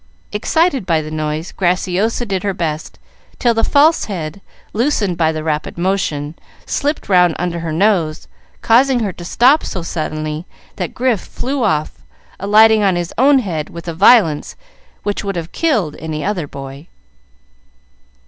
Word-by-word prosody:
Excited 270 - +1
by 165 -3 +2
the 155 - -8
noise, 155 +2 -3
Graciosa 190 +5 0
did 195 -4 -2
her 200 -1 -2
best, 155 -3 -4 0.4
till 240 -2 +2
the 225 0 0
false 305 +3 +4
head, 175 -2 -5 0.3
loosened 220 -6 0
by 160 -1 +2
the 155 -1 -4
rapid 155 0 -3
motion, 170 -5 -1 0.3
slipped 290 +2 -2
round 180 -4 +4
under 175 0 -2
her 165 -1 -4
nose, 165 -3 +1 0.4
causing 250 +2 +4
her 200 -4 -2
to 175 - -10
stop 255 - +4
so 185 - -4
suddenly 155 0 -4 0.3
that 180 -4 -4
Grif 245 -6 +1
flew 265 +1 -3
off, 155 -7 -1 0.4
alighting 215 +2 +5
on 195 -3 +2
his 175 -1 -3
own 275 +2 +6
head 170 - -2
with 170 0 -10
a 170 - -3
violence 170 -4 +4 0.5
which 205 0 -2
would 200 -2 -3
have 170 -1 -5
killed 225 - 0
any 155 -1 -4
other 185 -7 -2
boy. 140 +3 -9
180 Hz, 155 wpm, -17 LUFS, 160-225 Hz, 0.5 s, own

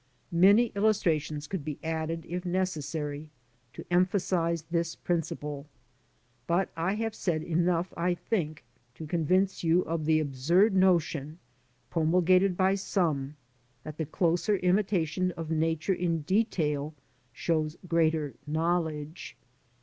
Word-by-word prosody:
* - - -39 0.2
Many 220 +3 +5
illustrations 165 -8 +1
could 185 -2 -4
be 150 -1 -5
added, 160 0 -3
if 175 +1 -4
necessary, 155 -5 -3 0.4
to - - -9
emphasise 175 -2 +1
this 170 0 -2
principle, 150 -4 -3 0.8
but 175 +2 +1
I 170 +5 0
have 225 0 -2
said 165 -7 -1
enough 175 +1 0
I 175 +1 0
think 160 -7 -3 0.3
to 160 - -7
convince 180 +5 +1
you 170 +2 +3
of 160 -2 -3
the 155 0 +3
absurd 155 - +2
notion, 165 -5 +2 0.5
promulgated 180 +3 +3
by 190 0 +3
some, 160 -8 -1 0.5
t - - -35
hat 155 - -9
t - - +1
he - - -22
closer 175 +5 +1
imitation 185 -2 +1
of 165 -1 -5
Nature 160 +3 +1
in 170 -3 -1
detail 155 -5 0 0.4
shows 155 +4 -1
e^reater 160 -4 +1
knowledere. 160 -1 -1
165 Hz, 125 wpm, -29 LUFS, 155-185 Hz, 0.8 s, Many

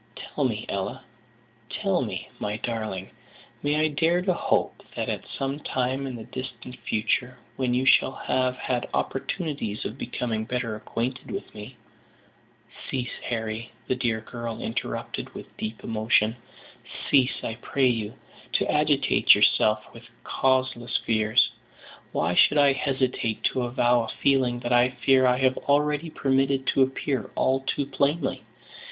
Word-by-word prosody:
"Tell - - -3
me, - - -1
Ella, - - -3 0.7
tell - - 0
me, - - -4
my 105 +1 -2
darling, 110 -5 -4 0.5
may 145 +1 +1
I 155 +1 +3
dare 165 +4 +2
to 185 -1 +2
hope - - 0
that - - -2
at - - -4
some 135 +1 -2
time 130 0 -1
in 130 - -5
the 115 - -7
distant 125 +1 -7
future, 125 +3 -1 0.2
when 125 -1 0
you 130 +1 +1
shall 135 - +5
have 130 -1 0
had 125 -2 -2
opportunities 140 - -2
of 120 +6 -5
becoming 115 -2 -2
better 125 -1 -2
acquainted 120 +4 -4
with 195 0 -6
me 110 +4 -10 0.5
" 120 0 -19
"Cease, 125 -3 -2
Harry," 110 -1 -3 0.2
the 130 - +1
dear 120 -3 0
girl 115 0 -6
interrupted, 115 - -4
with - - -10
deep 110 +1 -5
emotion, 110 0 +2 0.8
"cease, 135 -2 +3
I 115 - -4
pray 135 -2 +2
you, 115 -4 -1 0.4
to - - +1
agitate - - +5
yourself 110 0 +3
with 120 0 -13
causeless 130 -2 +1
fears. 110 -1 +3 0.6
Why 85 - 0
should 145 - +5
I 140 -1 +6
hesitate 130 -5 -1
to 130 - 0
avow 120 -1 +2
a - - -6
feeling 130 -3 +3
that 120 - 0
I 125 +1 +4
fear 130 -1 +6
I 125 0 +4
have 130 0 +2
already 150 +2 +1
permitted 135 -2 +1
to 135 - +3
appear 130 -3 0
all 130 0 +2
too 135 +1 -2
plainly. 140 +1 0
125 Hz, 150 wpm, -26 LUFS, 115-135 Hz, 0.8 s, I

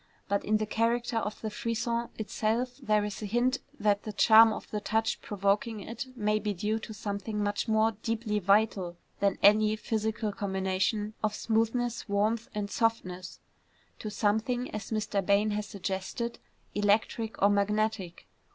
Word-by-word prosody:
But 200 0 0
in 215 +1 +2
the 215 - -1
character 230 +2 0
of 215 -1 -2
the 220 - -3
frisson 235 +2 -2
itself 225 +3 -1
there 215 -4 +2
is 210 +1 -5
a 210 - -3
hint 240 +5 +1 0.2
that 205 -1 +2
the 215 - -5
charm 220 +2 +7
of - - -6
the 210 - -2
touch 220 +2 0
provoking 205 +2 0
it 230 +6 -6
may 210 -2 +1
be 210 -1 -2
due 210 +5 -1
to 220 - -8
something 210 0 -3
much 205 +3 -1
more 220 0 +3
deeply 220 0 -2
vital 195 -3 +2 0.2
than 200 -1 +2
any 215 +1 +6
physical 220 0 -2
combination 195 +2 -1
of 215 -1 +1
smoothness, 230 +1 0
warmth 215 +3 +1
and 205 -1 -3
softness, 185 -6 -1 0.6
to 215 - -4
something, 220 +4 0
as 215 - -5
Mr. 215 -2 -1
Bain 200 +2 +3
has 210 0 -2
suggested, 200 +4 -4 0.3
electric 215 +2 +1
or 200 +1 +5
magnetic. 205 -2 0
215 Hz, 155 wpm, -29 LUFS, 205-225 Hz, 0.6 s, charm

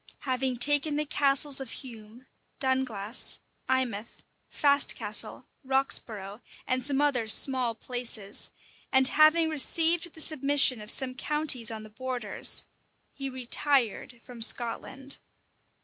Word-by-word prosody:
Having 255 -1 -2
taking 290 +4 +3
the 300 +1 -2
castles 280 -1 +4
of 265 -3 -7
Hume, 230 -1 -9 0.3
Dunglass, 255 -5 -2 0.3
Eymouth, 240 -4 -3 0.3
Fastcastle, 285 -1 +2 0.2
Roxborough, 230 -6 -1 0.2
and 255 0 -1
some 280 +1 0
other 260 -6 0
small 250 0 +2
places, 230 -4 -6 0.4
and 265 0 +5
having 310 +2 +4
received 330 +3 +1
the - - -12
submission 280 -5 +2
of 210 - -9
some 255 +1 +2
counties 270 -4 +1
on 220 -1 -6
the 215 - -13
borders, 250 -2 -1 0.5
he 275 -1 -6
retired 255 -2 0
from 245 -2 -13
Scotland. 260 +4 0
260 Hz, 115 wpm, -27 LUFS, 235-285 Hz, 0.5 s, and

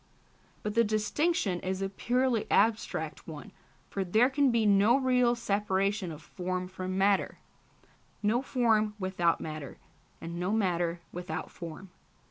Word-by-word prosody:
But 210 - -2
this 230 0 +3
distinction 215 - 0
is 185 +1 -3
a 195 - -1
purely 240 +4 0
abstract 225 0 +1
one, - - -8 0.4
for 195 - -2
there 220 +8 +3
can 280 0 +3
be 230 -2 +2
no 205 +4 +5
real 250 -2 +3
separation 200 -3 0
of 155 0 -10
form 185 +1 -4
from 185 0 -4
matter, 195 0 +2 0.9
no 220 +4 +2
form 225 -6 +1
without 185 -4 +1
matter, 155 -3 -6 0.4
and 170 +1 -6
no 180 +4 0
matter 175 -5 0
without 180 +1 -5
form. 170 +2 -9
200 Hz, 135 wpm, -30 LUFS, 185-230 Hz, 0.9 s, no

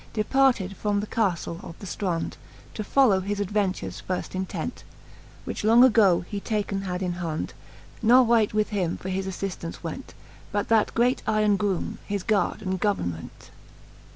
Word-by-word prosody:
Departed 220 -3 +2
from 205 -1 0
the 205 - -2
caftle 180 -6 -1
of 165 - -9
the - - -10
Strond, 180 -3 -2 0.4
To 215 - -4
follow 220 -3 +4
his 200 +2 -3
adventures 185 - -1
firft 185 - -2
intent, 185 0 -4 0.6
Which - - -4
long 230 +3 +7
agoe 205 -9 +5
he 200 +2 -4
taken 200 -2 -2
had 185 -1 -3
in 180 -1 -1
hond: 160 -2 -3 0.5
Ne 240 +3 +7
wight 230 -3 +3
with 215 0 +1
him 185 -6 -1
for 190 - -6
his 190 +1 -2
affiftance 185 -3 -5
went, - - -7 0.4
But 205 -1 -1
that 225 -2 +3
great 245 +2 +2
yron 215 -1 +3
groome, 195 -2 -2
his 200 -2 -2
gard 215 -3 0
and 185 0 -2
government. 85 - -3
200 Hz, 160 wpm, -26 LUFS, 185-215 Hz, 0.6 s, long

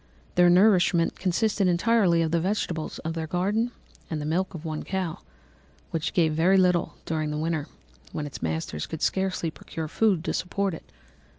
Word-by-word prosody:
Their 175 0 +5
nourishment 180 -2 +4
consisted 195 +2 +1
entirely 180 -1 +3
of 160 - -1
the 170 - +2
vegetables 175 -3 -2
of 160 - -1
their 160 -1 -3
garden 200 +8 0 0.4
and 160 - -2
the 150 - -4
milk 180 +4 -1
of 165 0 -8
one 155 -1 -3
cow, 190 -4 -3 0.7
which 165 0 -2
gave 160 -3 +3
very 175 +5 +4
little 180 -2 +2
during 155 -2 -1
the 150 - -2
winter, 155 -1 -1 0.4
when 150 - -3
its 145 - -8
masters 80 -1 -3
could 160 - -5
scarcely 190 -4 0
procure 160 +1 -6
food 190 0 +2
to - - -2
support 195 +1 -1
it. 160 - -10
170 Hz, 175 wpm, -26 LUFS, 160-190 Hz, 0.7 s, Their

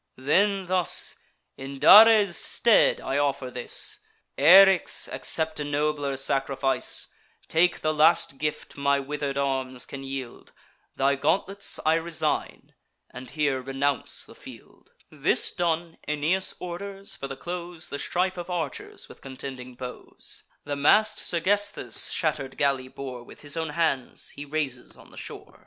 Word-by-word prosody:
Then, 190 +9 +1
thus: 180 -1 +2 0.4
"In 135 +1 -8
Dares' 205 +4 +8
stead 235 -3 +3
I 135 +2 -2
offer 140 -3 -1
this. 125 -1 -2 0.4
Eryx, 195 +1 +6
accept 160 -1 +2
a - - -2
nobler 145 -1 -1
sacrifice; 135 -1 -1 0.4
Take 175 +2 +2
the 155 - 0
last 155 -3 +3
gift 150 0 -4
my 140 0 +2
wither'd 140 0 -4
arms 130 -2 -2
can 135 - -8
yield: 135 -2 -7 0.4
Thy 135 +1 +2
gauntlets 195 +8 -1
I 155 - +4
resign, 165 0 -2 0.4
and 130 -1 -10
here 140 -2 -1
renounce 135 +1 -2
the - - -15
field." - - -15 0.2
This - - +1
done, 170 -1 -2
Aeneas 155 +6 0
orders, 195 +3 -7
for 135 - -6
the 135 - -7
close, 175 0 -6
The 140 - -5
strife 185 +1 -1
of 175 - -7
archers 165 -6 -5
with - - -15
contending 130 -1 -8
bows. 125 0 -9 0.2
The 145 0 -4
mast 210 +10 +3
Sergesthus' 185 - 0
shatter'd 140 -4 -2
galley 135 -2 +1
bore 130 -2 -8
With 120 - -14
his 145 0 -8
own 160 -1 -2
hands 150 -4 -2
he 145 - -8
raises 140 -4 -4
on - - -17
the - - -15
shore. - - -10
145 Hz, 140 wpm, -26 LUFS, 135-175 Hz, 0.4 s, Dares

